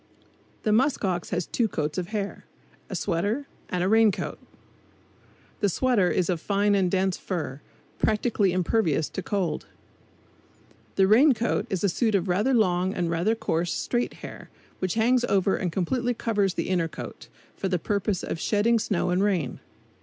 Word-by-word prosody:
The 215 - +1
musk 255 +1 +2
ox 180 -2 -1
has 175 -1 -1
two 235 - 0
coats 150 -6 -2
of 175 - -4
hair 205 -1 -4 0.4
a - - -4
sweater 205 +12 -1 0.2
and 180 -1 -1
a - - +1
rain 220 +1 +5
coat. - - -5 1.2
The 205 - +2
sweater 215 -3 +2
is 180 - +1
of 175 -4 -1
fine 205 +1 +2
and 190 -3 +2
dense 190 0 +1
fur, 155 -7 -4 0.4
practically 210 -3 +2
impervious 175 -4 +1
to - - -4
cold. 190 -4 -2 1.3
The 190 - +5
rain 255 +7 +6
coat 230 +2 -1
is 190 -1 -2
a - - +4
suit 220 +3 +1
of 190 -1 +1
rather 210 +9 +2
long 185 -3 +2
and 170 -2 -1
rather 175 +7 +1
coarse 170 -5 -1
straight 240 0 -1
hair, - - -10 0.3
which 185 0 -1
hangs 240 +2 +3
over 195 -3 +2
and 180 - -2
completely 240 +8 0
covers 205 -5 0
the - - -2
inner 175 -3 +1
coat, 160 - -9 0.3
for 195 - -2
the 185 - +1
purpose 200 +2 -1
of - - -4
shedding 225 +5 +2
snow 180 -4 0
and 180 +2 +2
rain. 175 -11 0
195 Hz, 170 wpm, -26 LUFS, 180-220 Hz, 1.3 s, rain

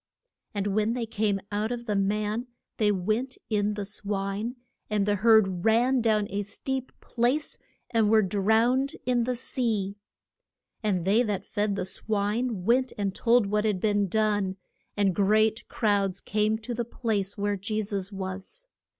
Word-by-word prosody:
And 200 -1 -1
when 210 +2 +1
they 240 -1 -2
came 210 -2 0
out 210 +3 -1
of 240 -1 -4
the 210 -3 -1
man 210 +4 0 0.3
they 210 -2 +3
went 215 +7 -1
in 210 0 +1
the 205 -1 -3
swine, 205 +3 -2 0.3
and 210 -2 +1
the 205 0 +1
herd 195 -4 +4
ran 240 +3 +3
down 215 -2 +2
a 200 +1 -1
steep 260 +6 -4
place 250 +5 0 0.3
and 225 -3 +3
were 220 0 +5
drowned 220 +8 +2
in 245 -2 +2
the 250 0 -1
sea. 220 -5 -1 0.8
And 190 -6 0
they 205 +5 +4
that 210 -5 -2
fed 205 -1 -1
the 195 - -2
swine 210 +1 -1
went 255 +3 +3
and 200 -2 -1
told 235 +1 +3
what 210 +1 0
had 210 -4 +1
been 205 0 +2
done, 205 -1 +1 0.4
and 200 -2 +3
great 215 +3 +2
crowds 200 -3 +1
came 215 +1 0
to 225 +2 -5
the 240 +1 -1
place 215 -4 -2
where 205 0 0
Je 215 +3 -2
sus 195 -1 -2
was. 195 - -6
210 Hz, 160 wpm, -27 LUFS, 200-230 Hz, 0.8 s, were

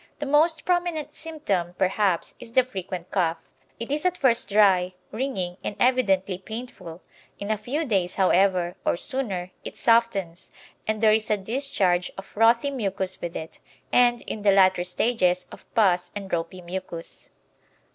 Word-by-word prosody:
The 295 - -4
most 310 +3 +2
prominent 345 -4 -1
symptom, 205 - -3
perhaps, 190 -2 +1
is 230 -1 -11
the 255 - +5
frequent 185 -6 -7
cough. 170 -4 +1 0.4
It 230 +3 -5
is 300 +1 0
at 365 -1 +1
first 235 -6 +2
dry, 190 -3 +4 0.2
ringing, 200 -7 -3
and 205 - -3
evidently 195 -7 +2
painful; 195 -6 -8 0.3
in 200 +1 -4
a 215 - +1
few 285 +9 -2
days, 190 -7 0
however, 185 -2 +2
or - - +1
sooner, 195 -8 -2
it - - -8
softens, 215 -7 +1 0.4
and 220 0 -1
there 215 -1 +6
is 220 0 0
a 215 - +2
discharge 195 -5 0
of 195 - -7
frothy 230 +7 +3
mucus 195 -7 0
with 170 -1 -5
it, 160 - -7 0.3
and, 240 -1 +4
in 215 - -5
the 205 -1 +4
latter 190 -2 +4
stages, 180 -1 +1
of - - -14
pus 180 -5 +3
and 200 -2 -6
ropy 170 +2 -3
mucus. 175 -1 -6
200 Hz, 155 wpm, -25 LUFS, 180-245 Hz, 0.4 s, there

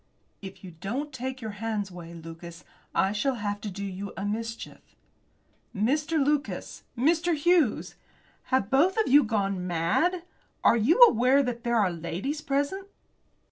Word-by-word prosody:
"If 195 -1 -10
you 185 - -9
don't 235 - -5
take 260 +1 -5
your 220 -1 -4
hands 215 -4 -2
away, 170 -1 -10
Lucas, 170 +1 -10 0.3
I 190 - +2
shall 235 +6 0
have 205 -2 -3
to 210 - -4
do 200 +1 -6
you 195 +1 -6
a 195 - -3
mischief." 225 +2 -5 0.9
"Mr. 295 +10 +1
Lucas! 295 0 -2 0.2
Mr. 330 +6 +2
Hughes! 310 -5 +2 0.5
Have 260 -3 +2
you 195 - -18
both 335 +9 +3
of 440 - +2
you 285 +3 +6
gone 200 -5 -1
mad? 180 - +1 0.4
Are - - +6
you 240 - +3
aware 260 - +5
that 240 -2 -4
there 235 0 0
are 200 -5 +3
ladies 180 - -4
present?" 290 +8 -2
230 Hz, 155 wpm, -27 LUFS, 195-285 Hz, 0.9 s, you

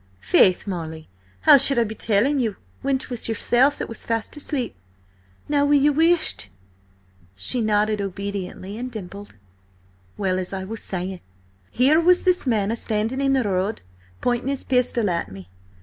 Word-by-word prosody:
"Faith, 180 - +3
Molly, 160 -5 -6 0.3
how 280 - +8
should 275 0 +5
I 235 - +4
be 220 -1 -5
telling 230 +7 +1
you 225 -5 -1 0.3
when 275 0 +1
'twas 245 -3 -3
yourself 245 +5 +2
that - - -4
was 230 - -7
fast 230 +3 -3
asleep? 285 -4 -3 0.7
Now 290 -1 +2
will 290 0 +3
you 290 +1 +3
whisht?" 320 - +1 0.9
She 165 - -1
nodded 215 -1 +1
obediently, 200 +1 -5
and 250 +1 -5
dimpled. 205 -2 -9 0.8
"Well, 185 -2 0
as 185 +1 -4
I 190 -1 -4
say, 185 -4 -3 0.5
here 280 +7 +3
was 360 +1 +4
this 365 -6 +1
man 220 -2 +1
standing 225 +4 -2
in 275 0 +2
the 265 -2 +2
road, 195 +1 -1 0.4
pointing 245 +1 0
his 275 -1 -3
pistol 250 -3 +1
at 170 - -2
me. 95 -2 -11
225 Hz, 155 wpm, -23 LUFS, 195-270 Hz, 0.9 s, how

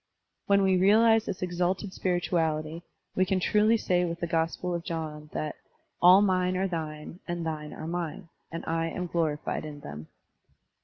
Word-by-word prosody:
When 200 0 +4
we 190 -1 +4
realize 220 +4 +5
thi$ - - -2
exalted 180 +2 -1
spirituality, 165 -3 -1 0.3
We 185 - +3
can 185 0 +1
truly 210 +4 +3
say 180 -4 +1
with 170 -1 -3
th0 170 -1 -3
Gospel 165 +2 0
of 170 -1 -3
John 155 -3 -5
that 155 -1 -4 0.4
"all 185 +3 +8
mine 185 -2 +2
are 190 +1 +1
thine, 160 -1 -5
and 175 -1 -3
thine 150 -2 -4
are - - -7
mine; 175 +2 -4 0.2
and 165 - -5
I 165 0 0
am 180 +2 -3
glorified 160 -4 -1
in 150 -2 -8
them." 75 - -8
175 Hz, 165 wpm, -28 LUFS, 160-185 Hz, 0.4 s, all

